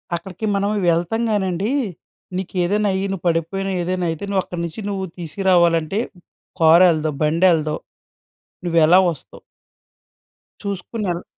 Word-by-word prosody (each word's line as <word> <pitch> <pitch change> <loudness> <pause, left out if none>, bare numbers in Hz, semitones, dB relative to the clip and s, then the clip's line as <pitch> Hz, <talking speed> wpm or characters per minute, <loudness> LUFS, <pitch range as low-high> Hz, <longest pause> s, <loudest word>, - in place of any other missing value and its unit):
అక్కడికి 185 +5 -6
మనం 200 +1 0 0.2
వెళ్తాం 175 +7 0
గానండి. 195 +2 0 0.7
నీకేదైనా 190 +3 0
అయ్యి, 190 +1 -1
నువ్వు 190 -3 -5
పడిపోయిన, 170 +4 -1
ఏదైనా 180 0 -1
అయితే, 165 +5 -6
నువ్వు 195 -2 +1
అక్కడి 175 -1 -6
నుంచి 170 +6 -6
నువ్వు 190 -1 -2
తీసుకురావాలంటే 170 +1 +2 0.6
కారెళ్ళదు, 160 -1 +5
బండెళ్ళదు. 155 -1 +3 0.9
నువ్వెలా 170 +1 +5
వస్తావు? 150 - -11 1.2
చూసుకొని 200 +2 -4
యెళ్ 175 +1 -3
180 Hz, 110 wpm, -20 LUFS, 165-195 Hz, 1.2 s, కారెళ్ళదు